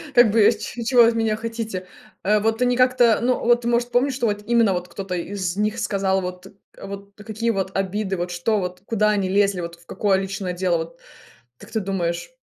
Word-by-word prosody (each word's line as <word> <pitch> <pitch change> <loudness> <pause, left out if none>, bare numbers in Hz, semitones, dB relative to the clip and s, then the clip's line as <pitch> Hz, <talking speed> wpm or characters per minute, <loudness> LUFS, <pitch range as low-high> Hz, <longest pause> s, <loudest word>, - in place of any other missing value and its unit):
Как 240 -4 +7
бы 220 -2 +5
ч 235 - -6
чего 245 0 +5
вы - - +6
от 230 - -2
меня 225 -1 +1
хотите? 225 -5 -5 0.4
Э, 210 +2 +3
вот 225 +3 0
они 245 0 +3
как-то, 250 -3 +4
ну 250 +1 +1
вот, 240 0 +2
может, 240 +1 +1
помнишь, 260 +3 +2
что 255 -2 -1
вот 205 0 -2
именно 230 -4 +3
вот 180 0 -3
кто-то 185 +1 -5
из 185 0 -3
них 210 +1 -1
сказал, 195 -1 0
вот 180 +1 -6 0.3
вот 200 0 -8
какие 220 +2 -2
вот 190 -2 -3
обиды, 195 0 -1
вот 175 +1 -3
что, 205 +5 0
вот 180 0 -5
куда 215 -1 +1
они 200 -3 0
лезли, 195 -1 +2
вот 170 0 -6
в 170 0 -23
какое 200 -2 +1
личное 195 -1 -4
дело, 175 -1 +1
вот 165 +1 -7 0.6
как - - -15
ты 220 - 0
думаешь? 190 - -3
205 Hz, 210 wpm, -22 LUFS, 185-230 Hz, 0.6 s, Как